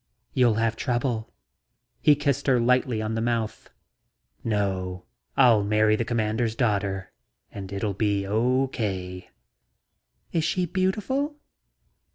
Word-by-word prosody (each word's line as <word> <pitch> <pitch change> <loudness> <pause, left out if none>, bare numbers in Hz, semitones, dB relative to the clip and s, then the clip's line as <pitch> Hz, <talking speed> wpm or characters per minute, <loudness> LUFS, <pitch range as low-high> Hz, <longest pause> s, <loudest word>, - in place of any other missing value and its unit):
"You'll 120 -4 +4
have 115 0 +1
trouble..." 120 -2 -1 0.7
He 150 - +6
kissed 140 -2 -1
her 130 -3 +4
lightly 120 -2 +2
on 110 +1 -2
the 115 - -1
mouth. 115 -2 -2 0.7
"No. 95 -4 -1 0.3
I'll 120 -6 +6
marry 105 +1 +3
the 115 - 0
Commander's 110 0 -1
daughter 100 -6 -1 0.4
and 95 -1 -7
it'll 100 +2 -2
all - - -2
be 100 -1 0
okay." 105 -5 -1 1.0
"Is 165 - 0
she 180 +3 +1
beautiful?" 210 - -1
115 Hz, 120 wpm, -26 LUFS, 100-130 Hz, 1.0 s, He